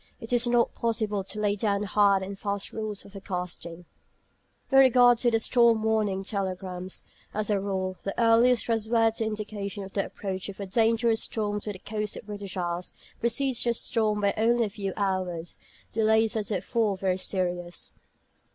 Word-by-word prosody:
It 225 +2 -5
is 240 0 +3
not 240 -1 +2
possible 215 -3 -1
to 210 - -6
lay 205 -1 +1
down 205 -1 0
hard 200 -1 +3
and 195 +1 -7
fast 200 -1 -3
rules 215 -2 -4
for - - -13
forecasting. 180 -3 -5 0.9
With 270 - +7
regard 245 -2 +6
to 240 - +3
the 225 - +3
storm 230 -1 +4
warning 215 -3 +1
telegrams, 185 -2 -4 0.3
as 215 0 0
a 205 - +2
rule, 190 -1 -2
the 195 - -4
earliest 235 +1 +4
trustworthy 225 0 +1
indication 210 -2 -4
of 190 - -10
the 195 - +1
approach 190 -1 -5
of 200 - -9
a 200 - -3
dangerous 225 +2 +2
storm 210 -2 -2
to 210 - -4
the 195 - -8
coasts 210 +1 -3
of - - -8
the - - -25
British 200 -2 -7
Isles 175 0 -3 0.2
precedes 245 +2 +2
the 235 -1 +1
storm 215 -2 +1
by 200 0 +2
only 235 +2 +3
a - - -4
few 195 -1 -4
hours. 185 -4 -2 0.3
Delays 220 0 +3
are 220 - +1
therefore 205 +1 -1
very 185 -1 0
serious. 180 -2 -2
210 Hz, 175 wpm, -27 LUFS, 195-225 Hz, 0.9 s, With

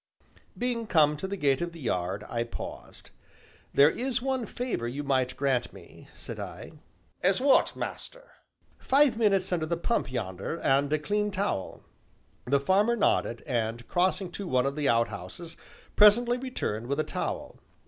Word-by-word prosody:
Being 240 -2 -2
come 150 -5 +4
to 190 - -4
the 200 +1 -4
gate 140 -4 +2
of 175 0 -3
the 165 - -11
yard, 95 - -2
I 115 0 -1
paused. 120 - -9 0.6
"There 140 - +6
is 255 +4 -1
one 260 -2 -2
favor 245 - -3
you 140 +5 -4
might 130 -2 0
grant 135 -4 0
me," - - -15
said - - -8
I. - - -7 0.5
"As 190 +1 +3
what, 270 +1 +4
master?" - - -6 0.5
"Five 280 -2 +4
minutes 195 -5 +2
under 165 -3 0
the 170 +1 -1
pump 170 - -1
yonder, 100 - -4
and 140 0 +2
a 155 - +3
clean 210 +7 -1
towel." 195 - -3 0.6
The 140 +3 +2
farmer 200 +10 +3
nodded, 120 - +1
and 115 -2 -2
crossing 185 +1 0
to 195 +1 -5
one 130 -4 +2
of 140 0 -1
the 150 -2 0
outhouses, 115 - -2 0.4
presently 235 +4 +6
returned 120 - -3
with 140 +3 -1
a - - +3
towel. - - -4
165 Hz, 160 wpm, -28 LUFS, 125-210 Hz, 0.6 s, There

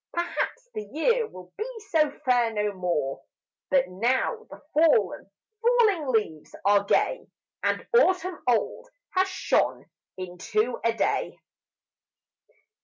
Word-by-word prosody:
Perhaps 350 +8 -2
the - - -3
year 460 - +1
will 180 -1 -13
be 455 +2 -5
so 310 -3 +4 0.2
fair 245 -3 +3
no 210 -1 -1
more, 170 -8 -2 0.5
But 275 -2 +3
now 250 - 0
the - - -11
fallen, 285 - +3 0.3
falling 450 - +3
leaves 215 -11 -1
are 200 0 +5
gay, 485 - +1 0.3
And - - -1
autumn 370 -6 +3
old 245 - 0 0.2
has 375 0 +2
shone 370 - 0 0.3
into 190 +6 -2
a 230 - +3
Day! - - -1
255 Hz, 115 wpm, -26 LUFS, -, 0.5 s, are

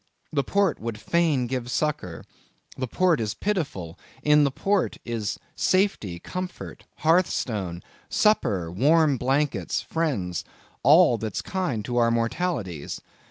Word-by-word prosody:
The 140 -2 +2
port 200 -2 +1
would 115 -2 -5
fain 160 -3 +1
give 120 0 -3
succor; 125 - -2 0.5
the 130 - -3
port 180 +4 +2
is 110 0 -2
pitiful; 135 - -3 0.2
in 150 0 +5
the - - +2
port 195 +8 0
is 115 -4 -2 0.2
safety, 185 - +1
comfort, 185 - -7 0.2
hearthstone, 110 - +1 0.3
supper, 105 - +2
warm 145 - +3
blankets, 135 +4 0
friends, 115 - -2 0.4
all 145 -3 +6
that's 110 -2 -3
kind 175 - -2
to 120 -1 -2
our 120 -1 +4
mortalities. 115 - -2
130 Hz, 120 wpm, -25 LUFS, 105-165 Hz, 0.5 s, all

